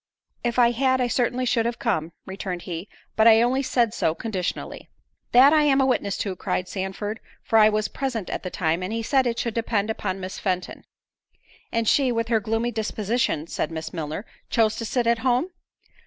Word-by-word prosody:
"If 240 Hz, 0 st, -1 dB
I 240 Hz, -1 st, +5 dB
had, 260 Hz, +2 st, +1 dB
I 250 Hz, -, +2 dB
certainly 245 Hz, +1 st, 0 dB
should 235 Hz, -1 st, +1 dB
have 235 Hz, 0 st, -3 dB
come," 160 Hz, +2 st, -1 dB
returned 190 Hz, -2 st, -5 dB
he, 175 Hz, +2 st, -6 dB, 0.3 s
"but 220 Hz, +1 st, +5 dB
I 225 Hz, 0 st, +7 dB
only 260 Hz, +3 st, +1 dB
said 240 Hz, -4 st, +1 dB
so 160 Hz, -7 st, 0 dB
conditionally." 190 Hz, -5 st, -4 dB, 0.4 s
"That 265 Hz, +5 st, +7 dB
I 310 Hz, -, +5 dB
am 280 Hz, -2 st, +3 dB
a 265 Hz, -, +4 dB
witness 205 Hz, -6 st, 0 dB
to," 195 Hz, -2 st, -3 dB
cried 180 Hz, 0 st, -2 dB
Sandford, 200 Hz, +3 st, -4 dB, 0.2 s
"for 225 Hz, -, +3 dB
I 215 Hz, 0 st, +7 dB
was 215 Hz, 0 st, 0 dB
present 245 Hz, -8 st, -3 dB
at -, -, -4 dB
the 185 Hz, -, -5 dB
time, 165 Hz, -1 st, -1 dB
and 185 Hz, +3 st, -3 dB
he 225 Hz, 0 st, -2 dB
said 265 Hz, +2 st, +2 dB
it 235 Hz, -1 st, -1 dB
should 235 Hz, -1 st, -2 dB
depend 220 Hz, -2 st, 0 dB
upon 195 Hz, -3 st, -3 dB
Miss 185 Hz, 0 st, -6 dB
Fenton." 185 Hz, -2 st, -3 dB, 0.9 s
"And 230 Hz, -1 st, 0 dB
she, 265 Hz, 0 st, +3 dB
with 230 Hz, -1 st, -1 dB
her 225 Hz, -2 st, +3 dB
gloomy 225 Hz, +3 st, -1 dB
disposition," 220 Hz, -5 st, -1 dB
said -, -, -3 dB
Miss 160 Hz, -1 st, -6 dB
Milner, 160 Hz, +4 st, -4 dB, 0.2 s
"chose 220 Hz, -2 st, +2 dB
to 230 Hz, -, -4 dB
sit 240 Hz, +2 st, 0 dB
at 235 Hz, 0 st, +2 dB
home." 255 Hz, +8 st, +1 dB
225 Hz, 200 wpm, -24 LUFS, 190-240 Hz, 0.9 s, I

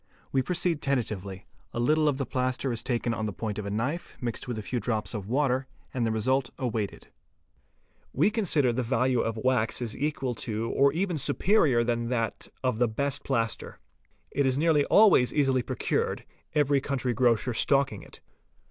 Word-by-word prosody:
We 135 Hz, -, +2 dB
proceed 170 Hz, 0 st, 0 dB
tentatively; 100 Hz, -8 st, -2 dB, 0.3 s
a -, -, -3 dB
little 155 Hz, +5 st, +3 dB
of 145 Hz, -3 st, +1 dB
the 135 Hz, -, -1 dB
plaster 130 Hz, +1 st, -1 dB
is 115 Hz, -, -2 dB
taken 120 Hz, -1 st, -1 dB
on 110 Hz, -1 st, -2 dB
the -, -, -3 dB
point 105 Hz, +1 st, -4 dB
of 105 Hz, -, -5 dB
a -, -, -2 dB
knife, 125 Hz, +12 st, -3 dB
mixed 120 Hz, -1 st, -4 dB
with 120 Hz, -2 st, -3 dB
a 110 Hz, -, -5 dB
few 125 Hz, +3 st, -2 dB
drops 110 Hz, 0 st, -2 dB
of 100 Hz, -3 st, -5 dB
water, 130 Hz, +1 st, +1 dB, 0.3 s
and 125 Hz, -, -1 dB
the -, -, 0 dB
result 125 Hz, +3 st, +1 dB
awaited. 110 Hz, -5 st, -3 dB, 1.0 s
We 160 Hz, +10 st, +2 dB
consider 165 Hz, -, +2 dB
that -, -, -6 dB
the 115 Hz, -, -6 dB
value 130 Hz, -1 st, +2 dB
of 115 Hz, 0 st, -2 dB
wax 115 Hz, -1 st, +1 dB
is 120 Hz, -3 st, -4 dB
equal 135 Hz, -3 st, -2 dB
to 115 Hz, 0 st, -2 dB
or 140 Hz, +1 st, +4 dB
even 175 Hz, +1 st, -1 dB
superior 150 Hz, -, +3 dB
to 120 Hz, 0 st, +1 dB
that 115 Hz, -3 st, -2 dB, 0.2 s
of 125 Hz, -4 st, 0 dB
the 120 Hz, -, +4 dB
best 140 Hz, +5 st, -2 dB
plaster. 115 Hz, -5 st, -2 dB, 0.5 s
It 140 Hz, -1 st, +1 dB
is 130 Hz, 0 st, +1 dB
nearly 150 Hz, -2 st, +3 dB
always 200 Hz, -, +5 dB
easily 135 Hz, -3 st, +2 dB
procured, -, -, -2 dB, 0.3 s
every 145 Hz, -2 st, +3 dB
country 130 Hz, -3 st, -1 dB
grocer 120 Hz, +1 st, +2 dB
stocking 135 Hz, -3 st, +2 dB
it. -, -, -14 dB
125 Hz, 185 wpm, -27 LUFS, 115-140 Hz, 1.0 s, always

